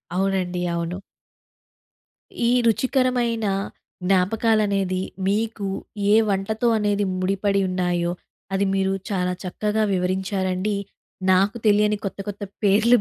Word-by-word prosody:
అవునండి. 185 -2 0
అవును. 170 +1 -3 1.5
ఈ - - +3
రుచికరమైన 245 -1 +1 0.6
జ్ఞాపకాలనేది, 195 0 +2 0.2
మీకు 210 0 -1 0.5
ఏ - - +7
వంటతో 210 +4 0
అనేది 205 -1 +1 0.2
ముడిపడి 195 +1 +1
ఉన్నాయో, 175 -1 0 0.4
అది 195 +1 +2
మీరు 195 0 +1 0.2
చాలా 180 -2 0
చక్కగా 210 +4 -1
వివరించారండి. 185 +1 -1 0.6
నాకు 195 +5 +3
తెలియని 210 0 +4
కొత్త, 195 - -5
కొత్త 205 0 -5 0.2
పేర్లు 215 +5 +5
195 Hz, 95 wpm, -23 LUFS, 185-215 Hz, 1.5 s, ఏ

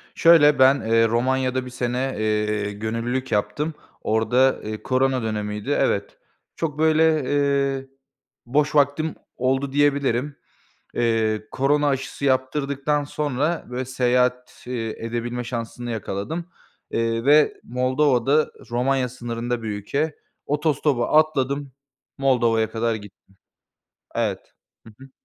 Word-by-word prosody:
Şöyle, 155 -4 +6
ben, 130 +1 +6
eee, 115 +1 +3
Romanya'da 130 +2 0
1 125 - -7
sene, 125 +2 -2
eee, 105 -1 0
gönüllülük 115 +5 -3
yaptım. 105 +10 -1 0.3
Orada, 120 +4 +2
eee, 110 0 -6
korona 130 0 +1
dönemiydi, 105 -1 -3
evet. - - 0 0.4
Çok 155 -2 -3
böyle, 160 0 +4
eee, 140 -1 0 0.6
boş 145 +5 +1
vaktim 145 +2 +2 0.2
oldu 135 +2 0
diyebilirim. 140 -1 +1 0.6
Eee, 110 -2 0
korona 145 +2 +2
aşısı 135 0 -2
yaptırdıktan 140 +2 0
sonra, 150 +3 -2
böyle, 125 +1 -3
seyahat, 125 0 0
eee, 120 -3 -3 0.2
edebilme 120 +1 -3
şansını 120 0 -5
yakaladım, 110 - -4 0.5
eee 115 0 -1
ve 150 +1 +5
Moldova'da 130 +3 +2 0.2
Romanya 125 +1 +1
sınırında 120 -1 -4
bir - - -4
ülke 140 +10 -2 0.3
otostopa 150 -4 +1
atladım, 140 -2 -1 0.5
Moldova'ya 115 -5 +2
kadar 115 0 0
gittim. 105 -2 -11 1.0
Evet. - - -2 0.3
Hı 110 - -14
hı. 135 0 -13
130 Hz, 110 wpm, -23 LUFS, 115-140 Hz, 1.0 s, Şöyle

